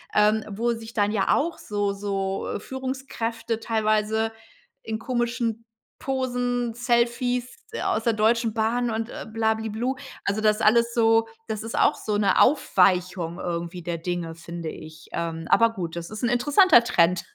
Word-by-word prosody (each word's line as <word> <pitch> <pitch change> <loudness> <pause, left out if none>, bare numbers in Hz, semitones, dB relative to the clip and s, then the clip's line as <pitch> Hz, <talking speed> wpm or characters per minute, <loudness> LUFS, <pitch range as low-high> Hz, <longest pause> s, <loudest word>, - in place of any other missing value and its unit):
ähm, 210 +1 +3
wo 230 +4 -1
sich 225 0 -9
dann 205 -1 +1
ja 205 -3 +2
auch 330 +3 -1
so 205 -1 -2
so, 195 -1 -3
äh, - - -3
Führungskräfte 235 -4 -4
teilweise 220 0 +1 0.5
in 220 0 -3
komischen 235 -2 -2 0.3
Posen, 245 -3 -1
Selfies 245 +1 0 0.3
aus 220 - 0
der 230 - +2
Deutschen 225 +1 +2
Bahn 230 +2 0
und, 225 +1 -3
äh, - - -7
bla, 220 -1 +2
bli, 220 0 -4
blu 240 +5 -2 0.3
also 200 +2 0
das 215 0 +2
alles 235 +2 +4
so 225 -1 +4 0.2
das 215 -1 -4
ist 225 - -5
auch - - +4
so 210 -1 -2
'ne 200 -2 +3
Aufweichung 180 - +2
irgendwie 175 +1 -4
der 170 0 -3
Dinge, 165 -1 -4
finde 170 0 -6
ich, 155 0 -11
ähm 165 -1 -4
Aber 230 0 +5
gut, 170 -5 -5
das 170 +3 -6
ist 215 - -6
'n 240 - +2
interessanter 280 +3 +5
Trend. 175 -5 +2
220 Hz, 165 wpm, -25 LUFS, 195-235 Hz, 0.5 s, Aber